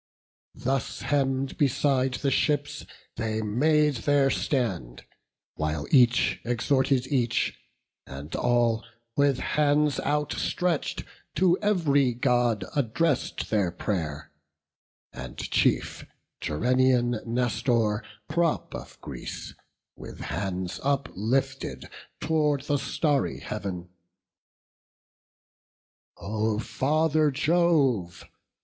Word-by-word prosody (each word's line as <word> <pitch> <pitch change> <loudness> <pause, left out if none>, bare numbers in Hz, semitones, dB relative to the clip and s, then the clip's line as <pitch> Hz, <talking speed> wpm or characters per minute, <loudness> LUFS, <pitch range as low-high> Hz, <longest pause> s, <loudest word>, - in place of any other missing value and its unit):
Thus 135 0 -2
hemm'd 135 -2 0
beside 135 -2 +2
the 140 +1 -1
ships 145 +1 0 0.3
they 110 -1 -2
made 150 +6 +2
their 140 +1 +2
stand, 95 - -2 0.5
While 75 -1 -2
each 125 -3 +4
exhorted 130 +2 +1
each, 125 -4 0 0.5
and 70 +4 -7
all, 120 -2 +2 0.3
with 140 -2 +3
hands 150 0 +2
Outstretch'd, 150 +3 -1 0.3
to 180 -1 +4
ev'ry 145 - +2
God 120 -5 +1
address'd 145 +2 0
their 100 -5 +2
pray'r: 85 -5 -3 0.8
And 65 -1 -8
chief, - - 0 0.4
Gerenian 120 +6 +2
Nestor, 115 -2 +1 0.3
prop 165 0 0
of - - -9
Greece, - - -7 0.4
With - - -10
hands 95 -2 -3
uplifted 135 -1 -1 0.3
tow'rd 150 -3 +1
the 145 0 +1
starry 145 0 0
Heav'n: 95 -4 -5 2.3
"O 110 +1 -1
Father 155 +6 +1
Jove! 145 - +1
130 Hz, 85 wpm, -27 LUFS, 110-145 Hz, 2.3 s, each